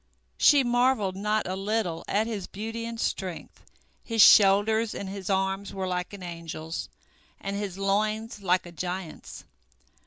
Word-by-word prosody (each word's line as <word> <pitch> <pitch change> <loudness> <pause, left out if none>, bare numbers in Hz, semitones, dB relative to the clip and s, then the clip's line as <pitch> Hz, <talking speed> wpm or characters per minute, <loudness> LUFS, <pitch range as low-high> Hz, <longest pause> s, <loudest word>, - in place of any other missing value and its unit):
She 285 -3 +6
marvelled 240 -5 +2
not 210 +2 0
a 185 - -2
little 195 -4 -2
at 210 +2 +1
his 215 -5 -4
beauty 225 +3 -5
and 230 -1 -6
strength. 185 -6 -4 0.4
His 225 -1 -4
shoulders 215 +3 +5
and 200 - -5
his 195 0 -6
arms 195 +1 -1
were 190 -1 -2
like 180 -1 -2
an 200 -2 -9
angel's, 165 -2 -6 0.5
and 195 0 -4
his 200 -2 -4
loins 215 +2 -1
like 185 -1 +1
a 175 - -10
giant's. 180 0 -6
200 Hz, 150 wpm, -27 LUFS, 185-220 Hz, 0.5 s, She